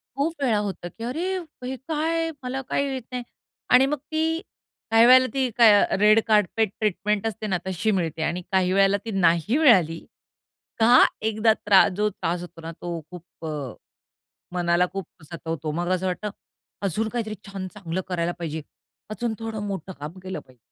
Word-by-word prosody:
खूप 290 Hz, +4 st, 0 dB
वेळा 235 Hz, -5 st, +3 dB
होतं 185 Hz, -3 st, -6 dB
की 225 Hz, -, -7 dB
अरे, 335 Hz, +10 st, -2 dB, 0.3 s
हे 255 Hz, +1 st, -3 dB
काय 305 Hz, +5 st, -2 dB
आहे? 330 Hz, 0 st, -1 dB
मला 255 Hz, +1 st, -3 dB
काही 280 Hz, -, +1 dB
येत 260 Hz, -, -4 dB
नाही 250 Hz, -1 st, -3 dB, 0.5 s
आणि 250 Hz, +1 st, +7 dB
मग 295 Hz, +2 st, -1 dB
ती 320 Hz, +1 st, 0 dB, 0.5 s
काही 225 Hz, +1 st, +7 dB
वेळेला 255 Hz, +1 st, +7 dB
ती 265 Hz, -2 st, +1 dB
काय 230 Hz, -3 st, +8 dB
अ, -, -, +1 dB
रेड 210 Hz, +2 st, +6 dB
कार्पेट 215 Hz, 0 st, +2 dB
ट्रीटमेंट 210 Hz, +1 st, 0 dB
असते 220 Hz, 0 st, -4 dB
ना 190 Hz, -3 st, +1 dB
तशी 190 Hz, +4 st, 0 dB
मिळते 165 Hz, -2 st, -3 dB
आणि 175 Hz, +3 st, -1 dB
काही 185 Hz, -1 st, +2 dB
वेळेला 195 Hz, +1 st, +4 dB
ती 225 Hz, -, -4 dB
नाही 170 Hz, -, +3 dB
मिळाली 185 Hz, -, +5 dB, 0.8 s
का 240 Hz, +3 st, +7 dB, 0.2 s
एकदा 220 Hz, +1 st, +3 dB
त्रास 195 Hz, -2 st, +6 dB
जो 210 Hz, +1 st, +2 dB
त्रास 175 Hz, -2 st, -3 dB
होतो 175 Hz, -1 st, -10 dB
ना 165 Hz, 0 st, -7 dB
तो 170 Hz, -1 st, -4 dB
खूप 175 Hz, -2 st, -11 dB
अ, -, -, -3 dB, 1.0 s
मनाला 175 Hz, 0 st, +2 dB
खूप 195 Hz, -3 st, -5 dB, 0.2 s
सतवतो. 160 Hz, -1 st, -5 dB
मग 175 Hz, +3 st, -2 dB
असं 185 Hz, +1 st, -2 dB
वाटतं 185 Hz, +3 st, -2 dB, 0.5 s
अजून 205 Hz, +3 st, -1 dB
काहीतरी 220 Hz, -2 st, -3 dB
छान 195 Hz, -1 st, -6 dB
चांगलं 185 Hz, -3 st, -4 dB
करायला 175 Hz, -1 st, -1 dB
पाहिजे. 160 Hz, -2 st, -4 dB, 0.5 s
अजून 225 Hz, +1 st, -2 dB
थोडं 225 Hz, -2 st, -5 dB
मोठं 195 Hz, -2 st, -5 dB
काम 150 Hz, +5 st, -8 dB
केलं 185 Hz, 0 st, -5 dB
पाहिजे. 130 Hz, -1 st, -22 dB
210 Hz, 175 wpm, -24 LUFS, 175-240 Hz, 1.0 s, काय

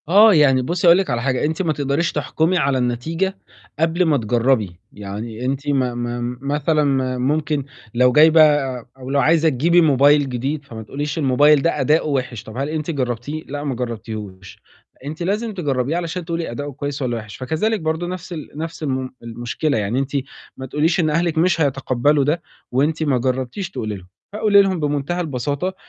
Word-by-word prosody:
آه، 210 Hz, +4 st, +7 dB
يعني 140 Hz, -5 st, +4 dB
بُصّي 175 Hz, +7 st, 0 dB
هاقول 170 Hz, +1 st, +8 dB
لِك 190 Hz, -5 st, -1 dB
على 120 Hz, -2 st, -1 dB
حاجة، 130 Hz, +1 st, 0 dB
أنتِ 160 Hz, +4 st, -1 dB
ما 165 Hz, -4 st, 0 dB
تقدريش 145 Hz, +4 st, 0 dB
تحكُمي 165 Hz, +3 st, 0 dB
على 140 Hz, -3 st, +1 dB
النتيجة 160 Hz, +11 st, -1 dB, 0.4 s
قبل 165 Hz, +3 st, +2 dB
ما 155 Hz, -3 st, +3 dB
تجرّبي. 115 Hz, -5 st, 0 dB
يعني 110 Hz, +4 st, -6 dB
أنتِ 135 Hz, +2 st, -2 dB
ما 130 Hz, -3 st, +1 dB
ما 120 Hz, 0 st, -3 dB
مثلًا 150 Hz, +2 st, +1 dB
ما 130 Hz, -2 st, 0 dB
ممكن 145 Hz, +2 st, 0 dB, 0.3 s
لو 125 Hz, +1 st, +4 dB
جايبة 160 Hz, +4 st, +6 dB, 0.6 s
أو 130 Hz, 0 st, -9 dB
لو 140 Hz, +1 st, +2 dB
عايزة 160 Hz, +4 st, +4 dB
تجيبي 165 Hz, +6 st, +3 dB
موبايل 145 Hz, -1 st, +4 dB
جديد، 135 Hz, +4 st, -3 dB
فما 115 Hz, -4 st, -8 dB
تقوليش 145 Hz, +7 st, -4 dB
الموبايل 145 Hz, +1 st, +4 dB
ده 170 Hz, -, 0 dB
أداؤه 155 Hz, +4 st, +2 dB
وِحِش، 130 Hz, -5 st, -2 dB
طَب 110 Hz, +2 st, -10 dB
هل 140 Hz, +2 st, -2 dB
أنتِ 155 Hz, +1 st, -3 dB
جرّبتيه؟ 135 Hz, +2 st, -3 dB
لأ 145 Hz, +1 st, -6 dB
ما 140 Hz, -3 st, -2 dB
جرّبتيهوش. 110 Hz, -6 st, -7 dB, 0.4 s
أنتِ 155 Hz, +4 st, -5 dB
لازم 210 Hz, +5 st, -1 dB
تجرّبيه 145 Hz, -4 st, -1 dB
علشان 175 Hz, 0 st, -4 dB
تقولي 165 Hz, -3 st, -3 dB
أداؤه 145 Hz, +4 st, -5 dB
كويس 145 Hz, 0 st, -5 dB
والّا 120 Hz, -3 st, -1 dB
وِحِش. 105 Hz, -2 st, -9 dB
فكذلك 160 Hz, -, -1 dB
برضه 160 Hz, +1 st, -2 dB
نَفْس 180 Hz, 0 st, -6 dB
ال 155 Hz, -3 st, -7 dB
نَفْس 160 Hz, +1 st, -6 dB
الم 130 Hz, -2 st, -2 dB
المشكلة، 120 Hz, +5 st, -2 dB
يعني 105 Hz, +4 st, -1 dB
أنتِ 135 Hz, 0 st, -3 dB, 0.5 s
ما 130 Hz, -, -6 dB
تقوليش 155 Hz, +7 st, +1 dB
إن 160 Hz, -2 st, +2 dB
أهلِك 165 Hz, +1 st, 0 dB
مش 170 Hz, 0 st, +2 dB
هيتقبَّلوا 140 Hz, 0 st, +2 dB
ده 155 Hz, +5 st, 0 dB, 0.3 s
وأنتِ 150 Hz, +5 st, +1 dB
ما 140 Hz, -4 st, +2 dB
جرّبتيش 130 Hz, -, -2 dB
تقولي 110 Hz, -, -4 dB
لهم. 95 Hz, -2 st, -12 dB, 0.3 s
فقولي 210 Hz, -1 st, +5 dB
لهم 190 Hz, -3 st, 0 dB
بمُنتهى 150 Hz, +4 st, -1 dB
البساطة 145 Hz, +4 st, -2 dB
145 Hz, 180 wpm, -20 LUFS, 125-160 Hz, 0.6 s, هاقول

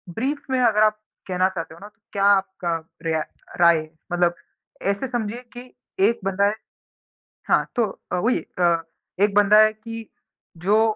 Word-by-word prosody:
Brief 275 Hz, +5 st, -2 dB
में 260 Hz, -, +2 dB
अगर 215 Hz, -3 st, +4 dB
आप 215 Hz, 0 st, +2 dB, 0.3 s
कहना 185 Hz, 0 st, +2 dB
चाहते 165 Hz, -4 st, -6 dB
हो 165 Hz, -, -14 dB
ना 205 Hz, -, -10 dB
तो 225 Hz, +1 st, -42 dB
क्या 200 Hz, -, 0 dB
आपका 190 Hz, -3 st, +2 dB, 0.3 s
रिया 160 Hz, -1 st, +1 dB, 0.4 s
राय 170 Hz, -1 st, +7 dB
है? 155 Hz, 0 st, -6 dB, 0.2 s
मतलब 175 Hz, 0 st, +2 dB, 0.6 s
ऐसे 200 Hz, +7 st, -3 dB
समझिए 240 Hz, -1 st, -3 dB, 0.2 s
कि 250 Hz, +1 st, -10 dB, 0.4 s
एक 235 Hz, -, -2 dB
बंदा 195 Hz, +1 st, +2 dB
है 205 Hz, +1 st, +1 dB, 0.9 s
हाँ, -, -, +3 dB
तो 235 Hz, -, +3 dB, 0.3 s
अ, -, -, +1 dB
वही 230 Hz, +8 st, +1 dB, 0.2 s
अ, 170 Hz, -2 st, +3 dB, 0.4 s
एक 205 Hz, 0 st, +3 dB
बंदा 205 Hz, 0 st, +6 dB
है 215 Hz, 0 st, +6 dB
कि 225 Hz, 0 st, -9 dB, 0.5 s
जो 210 Hz, +4 st, +4 dB
205 Hz, 170 wpm, -23 LUFS, 180-225 Hz, 0.9 s, राय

